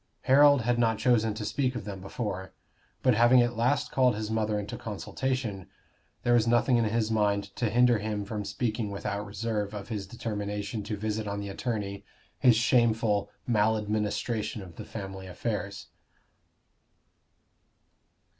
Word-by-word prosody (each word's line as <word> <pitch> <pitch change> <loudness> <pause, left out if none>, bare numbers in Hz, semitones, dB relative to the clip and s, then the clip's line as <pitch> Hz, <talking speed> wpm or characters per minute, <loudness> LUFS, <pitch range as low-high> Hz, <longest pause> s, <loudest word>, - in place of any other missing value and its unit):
Harold 145 0 +6
had 120 +1 +1
not 115 -2 +2
chosen 110 -2 +2
to 105 -1 -4
speak 130 +3 0
of - - -5
them 100 -2 -6
before; 95 -1 -5 0.5
but 130 - +5
having 120 +3 +6
at 120 0 +2
last 140 +5 +1
called 125 -4 +3
his 110 0 -4
mother 110 -1 0
into 105 0 -5
consultation, 110 -2 -3 0.6
there 120 - +3
was 115 -1 +4
nothing 120 +2 +4
in 115 - +2
his 110 0 0
mind 100 -2 0
to 115 - 0
hinder 120 -1 +4
him 105 -1 -3
from 105 0 -4
speaking 105 +1 -2
without 100 0 -3
reserve 105 0 -3
of 105 +2 -7
his 105 -4 -4
determination 105 -1 -4
to 105 0 -4
visit 110 +1 -2
on 100 0 -3
the 100 0 -5
attorney 100 -2 -3 0.4
his 125 -3 +6
shameful 115 -4 +2 0.2
maladministration 110 -1 0
of 85 -3 -12
the - - -8
family 95 -2 -7
affairs. 100 +1 -4
110 Hz, 150 wpm, -28 LUFS, 100-120 Hz, 0.6 s, Harold